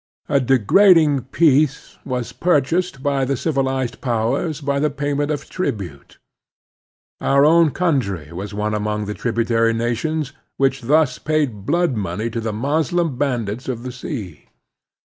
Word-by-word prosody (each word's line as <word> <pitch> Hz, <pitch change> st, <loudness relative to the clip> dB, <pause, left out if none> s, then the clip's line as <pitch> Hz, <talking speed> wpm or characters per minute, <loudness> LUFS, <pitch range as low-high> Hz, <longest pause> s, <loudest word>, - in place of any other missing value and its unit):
A 140 Hz, -, +2 dB
degrading 140 Hz, -, +4 dB
peace 145 Hz, 0 st, +1 dB
was 125 Hz, -2 st, -4 dB
pur 175 Hz, -4 st, +3 dB
chased 165 Hz, -1 st, -2 dB
by 140 Hz, -1 st, +1 dB
the 135 Hz, 0 st, -1 dB
civilized 130 Hz, -4 st, -1 dB
powers 130 Hz, +6 st, -1 dB
by 140 Hz, -1 st, -1 dB
the 150 Hz, +1 st, +2 dB
payment 145 Hz, 0 st, -2 dB
of 145 Hz, -2 st, -3 dB
tribute. 185 Hz, -, -5 dB, 1.0 s
Our 140 Hz, +1 st, +4 dB
own 165 Hz, +1 st, +5 dB
coimtry 125 Hz, -, -1 dB
was 95 Hz, +4 st, -6 dB
one 105 Hz, +1 st, -2 dB
among 105 Hz, 0 st, -2 dB
the 105 Hz, -, -4 dB
tributary 115 Hz, 0 st, +1 dB
nations 135 Hz, +6 st, -2 dB, 0.2 s
which 135 Hz, 0 st, +1 dB
thus 140 Hz, +1 st, +2 dB
paid 140 Hz, -10 st, -1 dB
blood 170 Hz, -3 st, +1 dB
money 105 Hz, +3 st, -3 dB
to 115 Hz, -, -3 dB
the 110 Hz, -1 st, -2 dB
Moslem 150 Hz, +6 st, 0 dB
bandits 120 Hz, -4 st, -2 dB
of 120 Hz, -2 st, -4 dB
the 125 Hz, -, -5 dB
sea. 115 Hz, -, -7 dB
135 Hz, 145 wpm, -20 LUFS, 115-150 Hz, 1.0 s, own